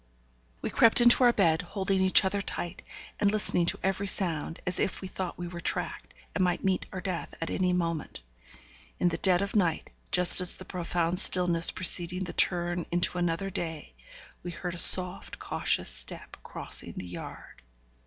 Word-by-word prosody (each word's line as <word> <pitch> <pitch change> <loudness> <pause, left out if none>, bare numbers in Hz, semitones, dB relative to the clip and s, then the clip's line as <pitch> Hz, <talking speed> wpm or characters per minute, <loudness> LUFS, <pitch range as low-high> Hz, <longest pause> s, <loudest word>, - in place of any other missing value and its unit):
We - - -3
crept 230 +1 +4
into 240 +1 +5
our 240 - +5
bed, 165 -8 +1
holding 190 +1 -3
each 190 +1 +5
other 200 +1 -2
tight, 175 -3 -7 0.4
and 205 - +2
listening 205 -5 +1
to - - +1
every 195 +1 -2
sound, 165 -5 -2
as 180 - -2
if - - -2
we 190 - -8
thought 185 -1 -7
we 175 - -7
were 175 0 -9
tracked, - - -5 0.2
and 190 - -1
might 180 -1 -2
meet 190 -1 -2
our 185 - -7
death 180 -3 -6
at 165 - -5
any 185 -1 -1
moment. 165 - -4 0.8
In 175 - +1
the 165 -1 -5
dead 185 -1 +2
of 200 - -7
night, 175 -6 -1 0.2
just 180 +1 +3
at 180 - +1
the 185 - -10
profound 175 -1 -3
stillness 175 -4 +3
preceding 180 0 0
the 180 - -7
turn 175 -1 0
into 175 +1 -1
another 175 +3 -3
day, 160 - -6 0.5
we 175 - -8
heard 175 +1 -7
a - - -8
soft, 180 +1 +7
cautious - - -2
step - - -4
crossing - - -3
the 90 - -7
yard. 90 -7 -11
180 Hz, 180 wpm, -27 LUFS, 170-190 Hz, 0.8 s, soft